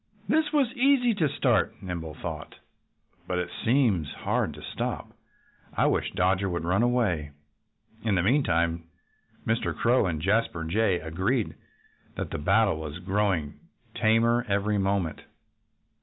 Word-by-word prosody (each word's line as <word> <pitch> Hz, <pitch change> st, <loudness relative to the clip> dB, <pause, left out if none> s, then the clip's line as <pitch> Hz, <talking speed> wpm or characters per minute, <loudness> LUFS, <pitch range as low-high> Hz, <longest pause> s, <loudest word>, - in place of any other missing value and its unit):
"This 300 Hz, +6 st, +2 dB
was 275 Hz, -5 st, +2 dB
easy 255 Hz, -2 st, +3 dB
to 160 Hz, -8 st, +1 dB
start," 125 Hz, -4 st, +1 dB
Nimble 85 Hz, -5 st, -6 dB
thought, 80 Hz, -1 st, -6 dB, 0.7 s
"but 90 Hz, -, -1 dB
it 90 Hz, -, -2 dB
seems 110 Hz, -, +2 dB
hard -, -, -1 dB
to -, -, -11 dB
stop. -, -, -4 dB, 0.7 s
I -, -, +3 dB
wish -, -, +1 dB
Dodger 95 Hz, +1 st, +1 dB
would 85 Hz, -2 st, -2 dB
run 90 Hz, +5 st, +1 dB
away." 115 Hz, -12 st, +1 dB, 0.7 s
In 110 Hz, -3 st, +1 dB
the 90 Hz, -, +2 dB
meantime 85 Hz, -, +1 dB, 0.6 s
Mr. 115 Hz, +1 st, 0 dB
Crow 120 Hz, -3 st, +3 dB
and 80 Hz, -3 st, -2 dB
Jasper 95 Hz, -1 st, 0 dB
Jay 95 Hz, +2 st, +1 dB
agreed 95 Hz, +9 st, -1 dB, 0.6 s
that -, -, -4 dB
the -, -, -3 dB
battle 95 Hz, +2 st, +2 dB
was 75 Hz, 0 st, -6 dB
growing 95 Hz, -4 st, -1 dB, 0.3 s
tamer 115 Hz, +2 st, +3 dB
every 100 Hz, +1 st, +1 dB
moment. 95 Hz, -4 st, -1 dB
100 Hz, 135 wpm, -27 LUFS, 85-120 Hz, 0.7 s, easy